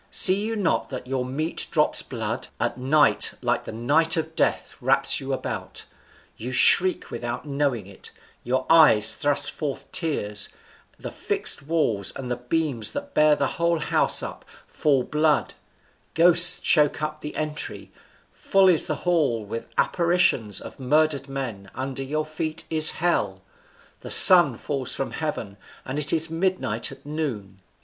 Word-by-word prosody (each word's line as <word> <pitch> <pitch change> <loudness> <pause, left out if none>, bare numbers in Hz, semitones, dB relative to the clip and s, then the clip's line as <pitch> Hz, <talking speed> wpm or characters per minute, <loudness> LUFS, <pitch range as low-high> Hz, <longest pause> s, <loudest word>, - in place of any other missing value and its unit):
see 190 +1 +7
you 225 +1 -3
not 200 -6 -1
that 130 - -7
your 130 0 -3
meat 150 +6 -3
drops - - +1
blood? - - -5
a - - -1
night, 135 +4 +2
like - - -1
the - - -7
night 150 +9 +2
of 160 0 -4
death, - - -1
wraps - - +3
you - - -6
about; - - -5 0.5
you 125 +3 -7
shriek 180 +8 +3
without 120 +2 -6
knowing 140 -7 -2
it; 95 0 -13 0.3
your 130 +2 -2
eyes 155 -10 +5
thrust 145 -2 -1
forth 145 -4 -6
tears; 105 - -1 0.5
the - - -8
fixed - - -2
walls, 140 - -1
and 125 -2 -7
the - - 0
beam 135 +2 -3
that 285 0 -7
bears 150 -1 +3
the 140 - 0
whole 170 +3 -1
house 150 - +1
up, - - -8 0.2
fall 140 -4 0
blood; 150 +1 0 0.6
ghosts 175 +1 +5
choke 150 -1 +2
up 155 0 -5
the 150 - -8
entry; 150 -1 -4 0.4
full 195 -1 +1
is 170 -4 +4
the 155 - -2
hall 145 -11 0
with 115 +3 -7
apparitions 170 - +1
of - - -11
murdered 140 +1 0
men; 115 -8 -6
under 135 +1 -5
your 150 +3 -3
feet 155 0 -5
is 155 -1 +5
hell; 105 - -1 0.6
the - - -10
sun 175 -10 +7
falls 135 -1 -4
from 135 - -4
heaven, 115 -11 -5 0.3
and 135 +3 -4
it 145 - +1
is 165 0 +1
midnight 165 - -2
at - - -14
noon." 120 -11 -6
150 Hz, 155 wpm, -23 LUFS, 125-160 Hz, 0.6 s, see